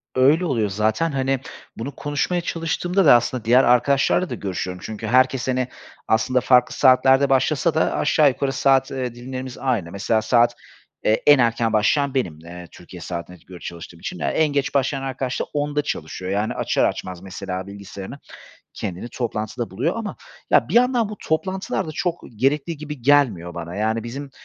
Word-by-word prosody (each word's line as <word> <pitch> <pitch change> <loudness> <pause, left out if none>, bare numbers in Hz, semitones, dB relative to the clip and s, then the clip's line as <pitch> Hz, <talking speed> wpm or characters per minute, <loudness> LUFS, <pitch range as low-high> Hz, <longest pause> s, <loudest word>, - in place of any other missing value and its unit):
Öyle 145 +7 +4
oluyor 115 -10 0
zaten, 110 +11 0
hani, 135 -1 0 0.4
bunu 130 +5 -6
konuşmaya 145 +5 -1
çalıştığımda 175 +3 -1
da 140 - +8
aslında 120 0 0
diğer 125 +3 +5
arkadaşlarla 135 +8 +3
da - - -3
görüşüyorum 90 -2 -4
çünkü 110 0 -6
herkes, 130 +2 +3
hani, 130 -1 0 0.4
aslında 125 +3 +2
farklı 125 -1 +3
saatlerde 135 +1 +5
başlasa 145 +4 +2
da 160 - +1
aşağı 150 0 +4
yukarı 135 +1 -2
saat, 135 0 +2
ııı, 130 -3 -3
dilimlerimiz 130 +1 -7
aynı. 115 -11 -1
Mesela 110 +3 0
saat, 120 +1 +3 0.5
eee, 110 - +2
en 145 -2 +8
erken 115 -1 +1
başlayan 135 +6 +2
benim, 90 - -2
eee, 85 +2 -10
Türkiye 90 0 -12
saatine 90 +1 -6
göre 90 -1 -11
çalıştığım 85 -1 -9
için. 180 - -6
Ya, - - -1
en 160 - +2
geç 140 -1 -1
başlayan 135 0 0
arkadaş 130 -1 -3
da - - 0
10'da 145 0 0
çalışıyor. 90 - -5
Yani, 105 +2 0
açar - - +1
açmaz 90 -1 -4
mesela 95 0 -6
bilgisayarını 100 +5 -9 0.6
kendini 95 +6 -5
toplantıda 115 -1 -4
buluyor 130 - -1
ama 225 -2 -5 0.3
ya - - +4
bir - - -4
yandan 245 -2 +3
bu 210 - -7
toplantılar 185 +5 -2
da - - -5
çok 175 +2 -2 0.2
gerekli 140 +7 0
gibi 150 -3 -8
gelmiyor 115 -11 +3
bana. 85 0 -6
Yani, 110 +2 0
bizim 135 +4 -6
130 Hz, 170 wpm, -22 LUFS, 105-145 Hz, 0.6 s, da